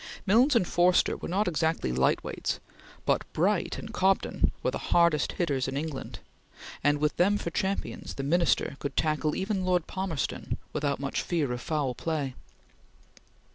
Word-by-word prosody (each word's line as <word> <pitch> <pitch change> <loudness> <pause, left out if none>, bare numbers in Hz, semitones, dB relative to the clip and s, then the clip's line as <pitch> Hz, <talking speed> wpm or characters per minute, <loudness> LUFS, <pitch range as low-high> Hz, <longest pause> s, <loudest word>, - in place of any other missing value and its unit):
Milnes 240 +8 +5
and 185 -7 +3
Forster 175 +1 +3
were - - -6
not 195 +4 +1
exactly 160 - 0
light 65 +1 +2
weights, - - -3 0.5
but - - +2
Bright - - +1
and - - -8
Cobden 190 +1 +2
were - - +1
the - - -4
hardest 170 -4 +3
hitters 140 -7 0
in 135 +1 -3
England, 150 -2 -4 0.7
and 145 0 +4
with 150 +1 0
them 200 +4 +4
for 170 - -4
champions 195 +2 -3
the 135 - -4
Minister 160 -2 +2
could 140 -2 -5
tackle 155 -1 +1
even 190 0 -1
Lord 180 -2 +1
Palmerston 185 - -3 0.2
without 145 -1 -1
much 140 0 -2
fear 155 -7 -1
of 125 0 -3
foul 145 -4 -1
play. 145 -1 -2
160 Hz, 160 wpm, -28 LUFS, 140-185 Hz, 0.7 s, Milnes